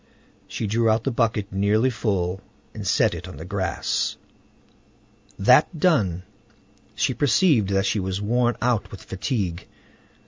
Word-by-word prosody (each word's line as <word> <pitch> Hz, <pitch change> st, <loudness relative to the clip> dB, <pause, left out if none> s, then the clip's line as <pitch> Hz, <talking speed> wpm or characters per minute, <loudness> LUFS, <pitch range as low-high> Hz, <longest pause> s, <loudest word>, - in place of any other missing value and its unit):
She -, -, -4 dB
drew 115 Hz, +2 st, +1 dB
out 110 Hz, +1 st, +2 dB
the 135 Hz, -, -1 dB
bucket 110 Hz, -4 st, 0 dB
nearly 105 Hz, +6 st, +2 dB
full, 95 Hz, -6 st, -2 dB, 0.3 s
and -, -, -6 dB
set -, -, +3 dB
it 85 Hz, +1 st, -7 dB
on 90 Hz, -, -10 dB
the 80 Hz, -, -8 dB
grass. 95 Hz, 0 st, -2 dB, 1.2 s
That 125 Hz, -, +4 dB
done, 100 Hz, -, +2 dB, 0.7 s
she -, -, 0 dB
perceived 145 Hz, -, +3 dB
that 95 Hz, 0 st, +1 dB
she 105 Hz, -, 0 dB
was 95 Hz, 0 st, -3 dB
worn 120 Hz, +3 st, +1 dB
out 115 Hz, -5 st, 0 dB
with 100 Hz, -, -11 dB
fatigue. 95 Hz, -3 st, -3 dB
105 Hz, 140 wpm, -23 LUFS, 95-120 Hz, 1.2 s, That